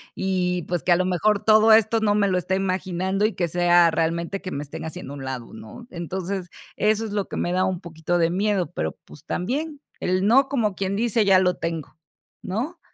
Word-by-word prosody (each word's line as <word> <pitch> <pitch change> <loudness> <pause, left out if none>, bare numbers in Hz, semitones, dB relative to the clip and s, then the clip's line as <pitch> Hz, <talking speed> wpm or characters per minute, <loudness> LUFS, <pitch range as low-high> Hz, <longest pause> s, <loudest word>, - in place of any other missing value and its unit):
y, 180 -2 -1
pues, 175 -1 -2
que 180 - 0
a 175 - +7
lo 185 - +1
mejor 195 +3 +1
todo 220 0 +6
esto 225 +1 +4
no 210 -1 +2
me 205 -1 +3
lo 185 -1 +1
estoy 190 +1 -1
imaginando, 190 +1 -1
y 215 - 0
que 175 - -1
sea 175 0 +4
realmente 170 +4 -1
que 185 - -6
me 140 - -4
estén 145 - -8
haciendo 150 -3 -7
a - - -7
un 135 - -7
lado, 130 -3 -6
¿no? 230 - -11
Entonces, 180 +1 -4 0.3
eso 215 +1 +1
es 215 - -6
lo 205 -1 -2
que - - -6
me 175 - -1
da 185 - +2
un 185 -2 -2
poquito 170 0 -3
de 165 0 +2
miedo, 195 -3 0
pero, 80 -1 -2
pues, 75 - -15
también, 285 - -3 0.2
el 185 +1 0
no, 265 +6 +4
como 225 -8 0
quien 195 +1 -2
dice, 225 0 +1
ya 195 -2 +5
lo 180 -1 +1
tengo, 165 -3 -5 0.4
¿no? 245 - -4
185 Hz, 225 wpm, -23 LUFS, 175-210 Hz, 0.4 s, a